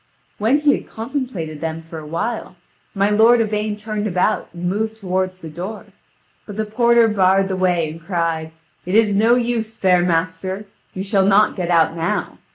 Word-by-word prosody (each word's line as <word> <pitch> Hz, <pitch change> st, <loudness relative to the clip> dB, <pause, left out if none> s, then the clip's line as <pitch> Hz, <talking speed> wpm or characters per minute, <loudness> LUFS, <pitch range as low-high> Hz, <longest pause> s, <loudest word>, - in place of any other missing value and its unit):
When 240 Hz, +8 st, +2 dB
he 295 Hz, -1 st, +4 dB
had -, -, -5 dB
contemplated 225 Hz, -, -5 dB
them 165 Hz, 0 st, -4 dB
for 160 Hz, 0 st, -8 dB
a 155 Hz, -, -10 dB
while, 215 Hz, +9 st, -3 dB, 0.4 s
my 200 Hz, +1 st, +2 dB
lord 225 Hz, +3 st, +5 dB
Yvain 210 Hz, -1 st, -1 dB
turned 215 Hz, 0 st, -3 dB
about 185 Hz, +3 st, 0 dB
and 175 Hz, +1 st, -5 dB
moved 220 Hz, +4 st, -2 dB
toward 185 Hz, -2 st, -1 dB
the 185 Hz, -3 st, -11 dB
door; 180 Hz, +7 st, -7 dB, 0.6 s
but 205 Hz, -1 st, -8 dB
the 220 Hz, -, -1 dB
porter 235 Hz, +1 st, +4 dB
barred 195 Hz, -2 st, +3 dB
the 190 Hz, -, -1 dB
way, 180 Hz, -3 st, +1 dB
and 165 Hz, +1 st, -11 dB
cried: 165 Hz, -2 st, -2 dB, 0.3 s
"It 180 Hz, +3 st, -2 dB
is 215 Hz, -2 st, +4 dB
no 225 Hz, +4 st, +4 dB
use, 235 Hz, -2 st, -2 dB
fair 180 Hz, -2 st, +3 dB
master; 180 Hz, +3 st, -1 dB, 0.3 s
you 190 Hz, -, -3 dB
shall 195 Hz, -1 st, +2 dB
not 205 Hz, +2 st, +4 dB
get 180 Hz, -3 st, -3 dB
out 165 Hz, -1 st, +3 dB
now. 165 Hz, 0 st, -2 dB
195 Hz, 180 wpm, -20 LUFS, 175-220 Hz, 0.6 s, lord